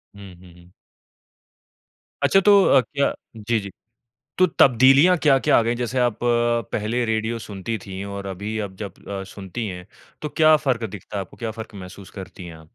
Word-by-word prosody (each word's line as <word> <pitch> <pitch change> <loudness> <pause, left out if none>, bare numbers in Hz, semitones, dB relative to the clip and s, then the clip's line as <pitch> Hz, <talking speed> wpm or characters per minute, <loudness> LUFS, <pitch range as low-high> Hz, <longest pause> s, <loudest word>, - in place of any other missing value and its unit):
हुँ, 100 -3 -12
हुँ, 90 -1 -17
हुँ। 90 +1 -19 1.5
अच्छा 195 - +5
तो 200 -1 +7
अ, 135 - +6
क्या 140 +2 -1 0.2
जी, 110 +1 -1
जी। 100 -1 -8 0.7
तो 185 - +6
तब्दीलियाँ 135 +8 +6
क्या-क्या 135 -3 +4
आ - - +5
गयी? 115 +1 0
जैसे 125 +1 -2
आप 120 -3 +1
पहले 120 -1 0
रेडियो 110 +1 -1
सुनती 105 +1 -5
थीं 95 0 -6
और 100 0 -6
अभी 100 +3 -5
आप 100 -2 -5
जब 100 -1 -7 0.2
अ, 100 -1 -4
सुनती 100 +3 -7
हैं 90 0 -8 0.3
तो 150 - -4
क्या 155 +2 +5
फ़र्क 125 -3 0
दिखता 100 +1 -8
है - - -1
आपको? 95 - -11
क्या 115 -2 -4
फ़र्क 110 0 -9
महसूस 95 0 -10
करती 95 -1 -10
है 85 - -9
आप? 80 - -14
110 Hz, 185 wpm, -22 LUFS, 95-120 Hz, 1.5 s, तो